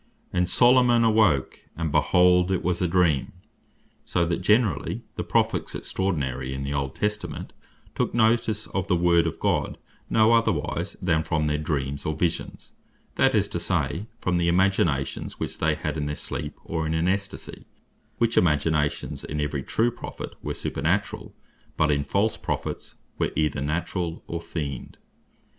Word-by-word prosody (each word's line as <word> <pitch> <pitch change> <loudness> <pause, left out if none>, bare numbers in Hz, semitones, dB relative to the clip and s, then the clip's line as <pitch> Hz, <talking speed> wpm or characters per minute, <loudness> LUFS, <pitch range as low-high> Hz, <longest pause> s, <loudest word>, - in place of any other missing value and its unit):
15.) - - -4
"And 90 - +2
Solomon 120 -1 +5
awoak, 110 -11 +3 0.2
and 80 -2 -2
behold 90 +3 +4
it 95 - 0
was 90 0 0
a 90 - +2
Dream:" 85 -5 +2 0.7
So 85 - 0
that 85 +1 -1
generally 105 +3 +1
the - - -3
Prophets - - 0
extraordinary 65 -8 -2
in 70 - -4
the 70 +1 -3
old 70 -1 -2
Testament 105 0 -3 0.4
took - - -1
notice 110 -2 +2
of 95 -1 -3
the 90 - +2
Word 85 -1 +3
of - - -4
God - - 0 0.3
no 110 +1 +4
otherwise, 110 -10 0
than 80 -3 +2
from 80 -1 -1
their 75 0 0
Dreams, 70 -3 -2
or 75 - -2
Visions, 85 +1 -3 0.4
that - - +3
is - - +3
to - - -2
say, 100 +6 -1
from 90 -4 0
the 85 0 +1
imaginations 85 -6 +1
which - - -4
they - - +2
had - - -3
in 75 -1 -2
their 75 - -3
sleep, - - -5
or 80 -1 -2
in 80 - -1
an 80 +1 +1
Extasie; 100 +1 -3 0.5
which 115 -1 +1
imaginations 75 -2 0
in 75 - -4
every 75 -1 -1
true 115 - +1
Prophet 120 - -8
were - - -3
supernaturall; 90 +9 -2 0.4
but 75 -1 +3
in 70 -1 +1
false 100 +9 +1
Prophets - - -4 0.2
were - - +1
either 75 -2 0
naturall, 85 +3 -2
or 85 0 -4
feigned. 70 -7 -5
85 Hz, 160 wpm, -25 LUFS, 75-100 Hz, 0.7 s, Solomon